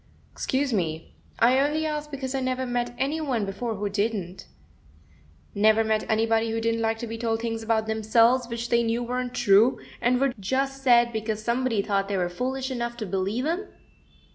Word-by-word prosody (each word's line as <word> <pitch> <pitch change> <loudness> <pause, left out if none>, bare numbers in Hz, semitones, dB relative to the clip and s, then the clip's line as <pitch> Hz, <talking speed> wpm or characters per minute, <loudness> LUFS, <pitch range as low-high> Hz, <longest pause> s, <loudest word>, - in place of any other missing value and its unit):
"Excuse 265 -1 -1
me; 165 -5 -2 0.2
I 245 +3 +4
only 300 +3 +1
asked 300 -1 -3
because 270 -2 -5
I 270 - 0
never 255 0 -1
met 245 -1 -2
any 290 +5 -1
one 250 -8 -1
before 220 +4 -3
who 205 +1 -2
didn't." 200 -3 -3 1.1
"Never 215 +2 +4
met 220 -1 -1
anybody 225 +1 +2
who 225 0 -1
didn't 230 0 0
like 225 0 0
to 235 - -5
be 225 0 -6
told 225 -1 0
things 225 -1 -3
about 220 -1 0
themselves 230 +3 +3
which 235 0 -4
they 235 0 +3
knew 230 +1 0
weren't 250 +1 -3
true, 225 +2 +4 0.2
and 245 +1 +2
were 275 -1 +1
just 270 +6 -1
said 240 -2 +4
because 220 -1 -3
somebody 235 -2 0
thought 195 -1 0
they 200 -1 -1
were 175 -1 0
foolish 260 +7 -3
enough 235 -1 -3
to 220 - -4
believe 195 +6 -1
'em?" 350 +6 -2
235 Hz, 190 wpm, -26 LUFS, 220-255 Hz, 1.1 s, I